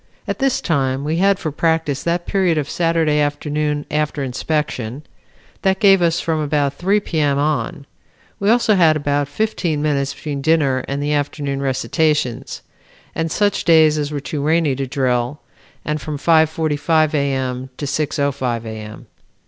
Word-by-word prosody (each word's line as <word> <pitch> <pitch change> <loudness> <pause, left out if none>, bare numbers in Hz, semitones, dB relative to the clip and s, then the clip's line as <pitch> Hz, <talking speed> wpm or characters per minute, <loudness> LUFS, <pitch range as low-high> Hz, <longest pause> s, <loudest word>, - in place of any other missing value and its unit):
At - - -3
this 270 -2 +1
time 135 -4 0
we 155 +3 -1
had 195 +2 +3
for 160 -4 -4
practice 160 -2 0
that 170 +1 -1
period 185 -5 +1
of 145 -2 -1
Saturday 165 -3 +1
afternoon 150 0 -1
after 150 -1 -1
inspection. 135 -1 -3 0.6
That 190 0 +1
gave 195 -3 +5
us 170 -1 +2
from 160 -1 -1
about 145 -2 0
3 195 +8 +1
P. 165 -4 -3
M. 145 -2 +2
on. 145 -1 -1 0.5
We 200 - +1
also 230 -1 +4
had 165 -5 +4
about 145 -1 0
fifteen 170 -2 -1
minutes 140 -2 0
between 145 -2 -5
dinner 140 -4 +2
and 140 +1 -2
the 150 +1 0
afternoon 145 -1 -2
recitations, 135 -1 -1 0.5
and 165 0 -2
such 205 +3 +1
days 155 -2 +5
as 145 0 -2
were 145 - -2
too 145 +1 -4
rainy 155 -1 +2
to 135 -1 -2
drill, 125 +1 -1 0.5
and 150 0 -2
from 150 -2 -4
5:45 155 0 +2
A. 140 -2 +1
M., 130 0 -3
to 145 - -4
6:05 140 -5 -1
A. - - -5
M. 105 0 -9
150 Hz, 165 wpm, -19 LUFS, 140-165 Hz, 0.6 s, gave